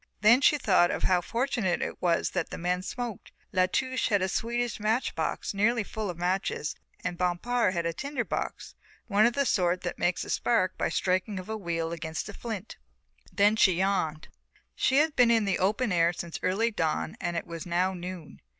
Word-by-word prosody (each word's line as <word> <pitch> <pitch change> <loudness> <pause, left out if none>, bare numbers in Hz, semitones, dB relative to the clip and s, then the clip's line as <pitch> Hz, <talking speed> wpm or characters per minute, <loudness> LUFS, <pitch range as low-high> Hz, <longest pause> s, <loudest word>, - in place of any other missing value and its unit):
Then 235 +5 +6
she 295 - +5
thought 185 -9 +2
how 180 -1 +3
fortunate 230 -4 -1
it - - -5
was 170 -2 +1
that 180 -3 -2
men 180 +1 -1
smoked. 235 +2 -6 0.2
La 185 -1 +3
Touche 260 +6 0
had 205 -4 +2
a - - +1
Swedish 235 +4 -2
match 220 +4 0
box - - -2
nearly 220 +3 +2
full 215 0 -4
of 175 - -5
matches 180 -3 -1 0.3
and 175 -1 -3
Bompard 185 +4 +1
had 170 -1 -1
a 170 - 0
tinder 275 - -3
box, - - -4 0.3
one 210 +1 +4
of 240 - 0
the 280 +3 +1
sort 180 -5 +1
that 175 - -4
makes 175 0 +1
a - - -6
spark 185 -6 +1
by - - 0
the - - -5
striking 185 +2 0
of 185 +2 -7
a 220 - -2
wheel 170 -5 -2
against 160 -1 -4
a - - -7
flint. 220 -5 -6 0.5
Then 205 +2 +4
she 195 -4 +5
yawned. 170 -4 -1 0.4
She 265 - +2
had 305 +1 +3
been 245 -1 +5
in 225 -2 +3
the 195 - 0
open 210 +4 +1
air 170 -1 +3
since 170 -1 -6
early 215 +6 +1
dawn 160 -5 -1
and 175 -2 -2
it - - -3
was 165 0 -7
now 180 +2 +1
noon. 180 -3 -8
190 Hz, 200 wpm, -28 LUFS, 175-230 Hz, 0.5 s, Then